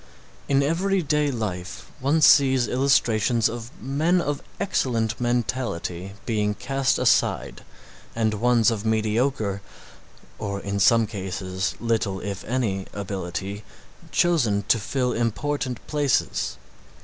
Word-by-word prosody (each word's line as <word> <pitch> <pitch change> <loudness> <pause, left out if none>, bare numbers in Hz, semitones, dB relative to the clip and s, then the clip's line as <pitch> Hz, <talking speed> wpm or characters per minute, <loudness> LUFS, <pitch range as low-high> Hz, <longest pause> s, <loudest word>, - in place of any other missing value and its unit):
In 140 0 +3
everyday 165 -2 +1
life 90 - -5
one 145 +5 +2
sees 135 -4 +6
illustrations 120 -3 +2
of 115 0 -6
men 155 +7 +1
of 145 -4 -2 0.2
excellent 120 - 0
mentality 120 -7 -2
being 105 -3 0
cast 135 +2 0
aside - - +1 0.5
and 110 -1 +1
ones 120 +1 +3
of 105 -3 -3
mediocre 110 -1 0 0.8
or 100 -2 -3
in 100 0 -3
some 115 +3 +5
cases, 95 -2 -3
little, 110 -4 0
if 100 -2 -5
any, 105 -6 -1
ability 100 +1 -5 0.5
chosen 135 -10 +2
to 115 - +4
fill 125 +3 -1
important 125 +2 -2
places. 145 - 0
115 Hz, 110 wpm, -24 LUFS, 100-135 Hz, 0.8 s, sees